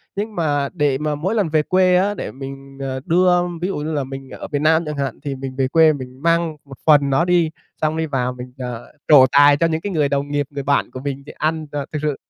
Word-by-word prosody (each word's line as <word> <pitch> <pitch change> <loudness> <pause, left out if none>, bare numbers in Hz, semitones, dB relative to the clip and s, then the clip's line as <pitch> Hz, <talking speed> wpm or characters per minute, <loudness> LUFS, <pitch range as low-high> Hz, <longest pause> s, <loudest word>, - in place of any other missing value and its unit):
Nhưng 210 +2 -4
mà 145 -4 0
để 145 -5 +1
mà 150 0 -2
mỗi 185 +10 -2
lần 200 -7 +1
về 155 -1 +2
quê 185 +2 +3
á 195 +3 +2
để - - -6
mình, 135 0 -9
ờ, 130 -1 -3
đưa 180 +1 +3 0.2
ví 180 - 0
dụ 195 - -3
như 155 +2 -3
là 145 -2 0
mình 135 0 -8
ở - - -8
miền 145 0 -1
Nam 160 +2 +4
chẳng 150 -1 -5
hạn 135 -3 -3
thì 140 -2 -3
mình 130 0 -7
về 135 -1 +1
quê 160 +3 +5
mình 130 -1 -9
mang 165 -1 +1
một 135 -2 -12
phần 145 -3 +5
nó 140 +6 +2
đi 175 -3 +2 0.3
xong 155 +1 0
đi 160 - 0
vào 125 -4 -1
mình, 125 0 -10
ờ, 125 -2 -7
trổ 140 -4 +8
tài 145 0 +6
cho 165 - +2
những 160 0 -2
cái 205 - -4
người 150 -5 +1
đồng 140 0 -1
nghiệp, 145 0 0
người 140 -1 -5
bạn 140 +1 +1
của 130 - -7
mình 140 0 -5
thì - - -9
ăn, 155 0 -1
ờ, 145 -2 -3
thực 155 - -3
sự 150 -2 -1
145 Hz, 270 wpm, -20 LUFS, 135-160 Hz, 0.3 s, trổ